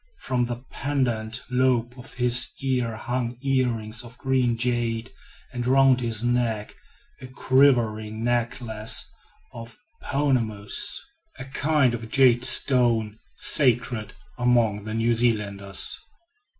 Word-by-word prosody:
From 125 -1 -1
the 120 +1 -7
pendant 120 -5 -2
lobe 125 -2 +1
of 130 +1 -12
his 125 0 +2
ears 125 -4 -2
hung 120 -1 -3
earrings 120 -5 -1
of 120 +1 -14
green 130 -3 0
jade, 120 -1 -1 0.4
and 120 -1 -4
round 135 -1 +4
his 115 -2 +1
neck 120 -3 -1 0.5
a 130 - -9
quivering 120 -5 +1
necklace 115 -2 -1 0.5
of 115 0 -10 0.2
"pounamous," 130 - +1 0.4
a - - -8
kind 140 -1 +1
of 115 -1 -6
jade 125 -2 +4
stone 115 -6 +3 0.2
sacred 120 -5 +2 0.3
among 115 -4 +1
the 110 0 -5
New 115 +1 +1
Zealanders. 105 -5 0
120 Hz, 110 wpm, -24 LUFS, 115-130 Hz, 0.5 s, round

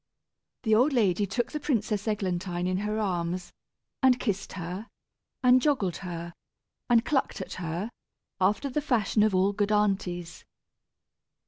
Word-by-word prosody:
The 220 -3 +2
old 255 +7 +4
lady 205 -4 +2
took 240 +5 -1
the 300 - -3
Princess 215 -7 -1
Eglantine 185 -4 -1
in 185 0 0
her 210 +2 -2
arms, 180 -3 -2 0.5
and 255 -1 +5
kissed 195 -4 -2
her, 180 +4 -5 0.6
and 250 0 +6
joggled 250 - +1
her, 170 -2 -6 0.6
and 235 -1 +4
clucked 280 -4 0
at - - -6
her, 175 +7 -3 0.5
after 205 +9 +2
the 275 +3 -1
fashion 230 -7 +1
of 210 -2 +3
all 190 +2 +3
good 205 +1 0
aunties. 190 -5 0
205 Hz, 140 wpm, -28 LUFS, 180-235 Hz, 0.6 s, and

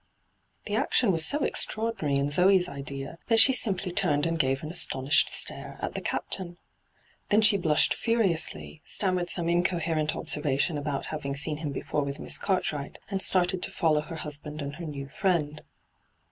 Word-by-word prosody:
The - - -5
action 235 -6 +2
was 165 -3 +1
so 290 - +2
extraordinary 215 - -1
in 140 +1 -1
Zee's 180 +3 +4
idea 140 +1 -7
that 225 -1 +3
she 265 +4 +6
simply 195 -6 0
turned 145 -4 +1
and 165 0 -1
gave 135 0 0
an 155 - -5
astonished 145 -4 +2
stare - - +1
at - - -4
the - - -4
Captain. 175 -2 -3 0.7
Then 210 +2 +4
she 210 - +6
blushed 160 -6 +2
furiously, 190 -9 0
stammered 185 -3 0
some 170 -2 0
incoherent 170 -3 0
observation 150 +2 +1
about 145 -1 -3
having 140 -3 -4
seen 150 +2 -1
him 150 -2 -4
before 145 +2 -3
with 140 0 -5
Miss - - 0
Cartwright, 155 -7 -2
and 195 -1 -1
started 180 -1 +2
to - - -1
follow 155 -4 +1
her 165 +2 -8
husband 150 0 -4
and 140 0 -5
her 170 -2 -6
new 140 -2 -6
friend. 155 -2 -1
160 Hz, 170 wpm, -27 LUFS, 145-185 Hz, 0.7 s, she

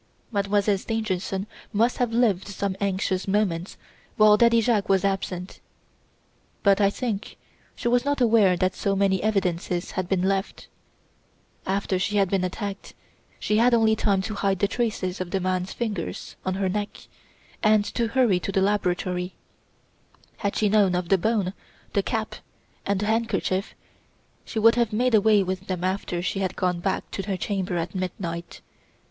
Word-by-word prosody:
"Mademoiselle 200 -1 +1
Stangerson 195 -3 -2 0.3
must 230 +3 +1
have 245 -2 +1
lived 225 -6 +2
some 200 -1 -3
anxious 190 -1 -1
moments 190 -3 0 0.4
while 215 -1 +7
Daddy 235 +1 +5
Jacques 220 -3 +1
was 195 -1 +3
absent; 190 -2 -3 1.0
but 200 0 +4
I 200 - +5
think 215 -1 -4 0.4
she - - -3
was 245 0 +3
not 285 0 0
aware 220 -7 +4
that 185 +1 +1
so 200 0 -1
many 195 -1 +2
evidences 180 -4 -1
had 185 -1 -3
been 185 -2 +1
left. 195 +1 -1 1.0
After 195 -1 0
she 205 +2 0
had 195 -2 +2
been 195 -2 +1
attacked 195 +2 -5 0.4
she 210 - +1
had 235 +2 +5
only 220 -1 +4
time 200 -3 +1
to 215 - -4
hide 200 -2 0
the 200 - +2
traces 200 -5 -2
of 180 - -4
the 195 - -1
man's 185 0 -1
fingers 210 -8 -4
on 185 0 -1
her 195 0 0
neck 205 +2 -3 0.6
and 215 -1 +4
to 235 -1 0
hurry 230 -6 +3
to 195 - -4
the 195 - +1
laboratory. 180 -2 0 1.0
Had 200 -1 -2
she 215 - +2
known 200 -3 +3
of 180 -1 -2
the 195 - +5
bone, 205 -2 0 0.4
the 200 - +3
cap, 220 +1 -3 0.5
and 200 -1 0
the - - 0
handkerchief, 220 -3 -1 0.7
she - - -7
would 230 +1 +6
have 235 -2 +1
made 245 +3 +1
away 215 -1 +5
with 185 +1 -4
them 180 -2 -3
after 185 -2 -2
she 190 +2 -1
had 190 -2 -2
gone 180 -1 0
back 190 +2 -2
to - - -3
her 195 -2 -1
chamber 190 -3 -2
at 170 +1 -3
midnight. 175 -2 -5
195 Hz, 165 wpm, -25 LUFS, 185-215 Hz, 1.0 s, while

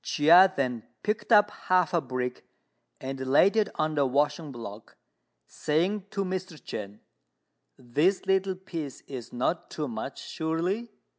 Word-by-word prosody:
Chia 175 +5 +6
then 125 -4 -1 0.2
picked 210 +3 -2
up 210 -1 +6
half 180 -2 +1
a 170 - +3
brick 125 -2 -4 0.6
and 135 0 -5
laid 180 +10 +5
it 215 -2 +2
on 155 0 0
the 145 -2 +2
washing 145 +3 0
block, 110 -4 -9 0.5
saying 185 +6 -1
to 195 -1 -2
Mr. 185 -3 -4
Chên, 100 0 -7 0.8
"This 150 +11 +1
little 190 0 +1
piece 165 -7 -7
is 130 -4 -8
not 130 +8 -1
too 150 -2 -4
much, 115 +3 -5
surely?" 175 +9 -2
160 Hz, 140 wpm, -28 LUFS, 130-190 Hz, 0.8 s, Chia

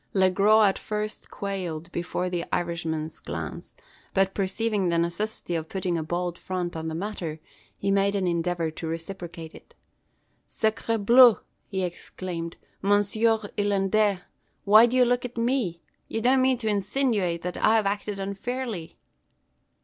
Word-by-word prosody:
Le 190 -1 +4
Gros 210 +3 +5
at 195 - +2
first 210 0 -4
quailed 180 -4 -4
before 180 +1 -2
the 175 -1 -2
Irishman's 165 -2 -2
glance; - - -6 0.4
but, 195 0 +3
perceiving 200 0 0
the 170 - +1
necessity 175 +3 -2
of 160 -1 -3
putting 185 -2 -1
a 165 - 0
bold 175 +2 -3
front 180 -2 -3
on 160 0 -4
the 160 - -3
matter, 170 -4 -4 0.4
he 195 - 0
made 200 +1 +2
an 195 -2 0
endeavour 170 -1 0
to 160 +1 -6
reciprocate 165 -1 -6
it. - - -16 0.7
"Sacre 225 +1 0
bleu!" 235 +2 +7 0.3
he 190 -2 -2
exclaimed. 175 -1 -5 0.2
"Monsieur 205 +3 +3 0.2
Irlandais 205 -1 +2 0.4
why 215 +3 +8
do 250 +2 0
you 250 - +6
look 245 0 +1
at 245 -1 -7
me? 230 -8 0 0.2
you 225 - -2
don't 255 +3 +4
mean 260 0 +3
to 225 - -4
insinuate 205 -4 0
that 180 0 -4
I've 220 -1 +4
acted 205 0 -2
unfairly?" 200 -1 -4
195 Hz, 150 wpm, -26 LUFS, 175-215 Hz, 0.7 s, why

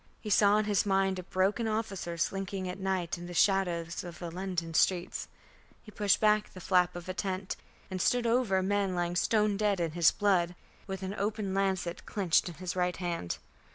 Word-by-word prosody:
He 210 - -5
saw 205 +1 +5
in 215 - +1
his 205 -2 +2
mind 195 -1 +1
a - - -6
broken 195 +5 0
officer 200 -6 -3
slinking 195 +2 -2
at 180 +2 -5
night 185 -3 -1
in 175 - -7
the 175 - -7
shadows 175 -4 +1
of 175 -2 -8
the 170 -2 -6
London 175 -2 -3
streets. 175 +2 +1 0.6
He 215 - -12
pushed 205 -2 +2
back 215 -1 +3
the 185 - -9
flap 180 -1 +2
of 175 0 -7
a 185 - -3
tent 185 +1 -3 0.4
and 185 -1 -2
stooped 245 +4 +2
over 230 -4 +2
a 190 - +1
man 200 -1 0
lying 175 0 -1
stone 210 +2 +2
dead 205 -2 +1
in 165 -2 0
his 170 0 +5
blood, 180 -4 +1 0.3
with 190 -1 -5
an 190 +1 -3
open 210 -1 -2
lancet 190 -3 -1
clinched 185 -4 +2
in 170 - -9
his 180 +3 -4
right 180 -1 0
hand. 170 - -3
190 Hz, 200 wpm, -30 LUFS, 175-205 Hz, 0.6 s, saw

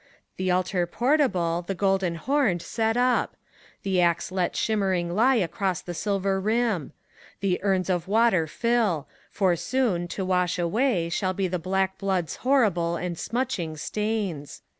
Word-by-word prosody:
The 185 0 -1
altar 180 0 +1
portable, 195 - +1
the 195 - -2
golden 190 -2 +1
homed, 210 - +1
set 225 0 -1
up 250 0 +2
I - - -43 0.5
The 190 -2 +1
axe 170 +1 +1
let 185 -2 -1
shimmering 190 -5 0
lie 245 +7 +4
across 185 -2 0
the 175 - -7
silver 195 +1 -1
rim! 215 - 0 0.5
The 190 -3 +1
urns 190 -2 +1
of 180 -2 -1
water 205 -6 +3
fill! 220 - 0 0.2
For 185 -3 +2
soon, 180 -1 0
to 190 +2 -4
wash 180 -1 +1
away. 180 0 +1
Shall 185 +2 -1
be 190 0 -1
the 180 0 -2
black 190 +2 -1
blood's 190 -4 -1
horrible 205 -11 +2
and 175 0 -3
smutching 195 -6 -3
stains. 205 -5 -3
190 Hz, 150 wpm, -25 LUFS, 175-220 Hz, 0.5 s, lie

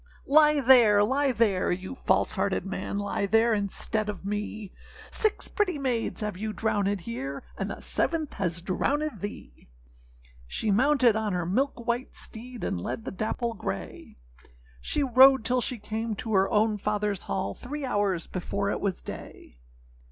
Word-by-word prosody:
â 275 - -5
âLie 300 -3 +6
there, 225 -6 +7
lie 270 +5 +2
there, 220 -6 +2
you 185 +4 -4
false 265 - +2
hearted - - -1
man, 195 +1 -4
Lie 200 0 -1
there 225 +3 +4
instead 210 +1 -1
of 200 -2 -6
me; 210 0 -4 0.4
Six 435 -2 +2
pretty 370 -6 0
maids 250 -6 -2
have 210 -3 -3
you 215 0 -4
drownèd 205 -3 0
here, 135 0 -5
And - - -3
the - - -7
seventh 315 -3 -1
has 175 -4 -3
drownèd 285 +7 -1
thee.â 190 - -8 0.8
She 210 - -1
mounted 255 +1 +4
on 215 -2 -1
her 175 -1 -1
milk 235 +5 -1
white 240 +2 -2
steed, 240 +1 -8
And 85 - -2
led 220 - -4
the - - -4
dapple 220 +4 -2
grey, 95 - -6 0.7
She 290 - 0
rode 265 -1 +6
till 250 +2 +2
she 250 0 -1
came 220 +1 -4
to 220 +2 -4
her 190 0 +3
own 215 0 +2
fatherâs 210 -1 -1
hall, 100 - -2
Three 285 - -6
hours 205 -7 0
before 200 +2 -2
it - - -3
was 195 -3 -2
day. - - -10
215 Hz, 165 wpm, -27 LUFS, 200-255 Hz, 0.8 s, there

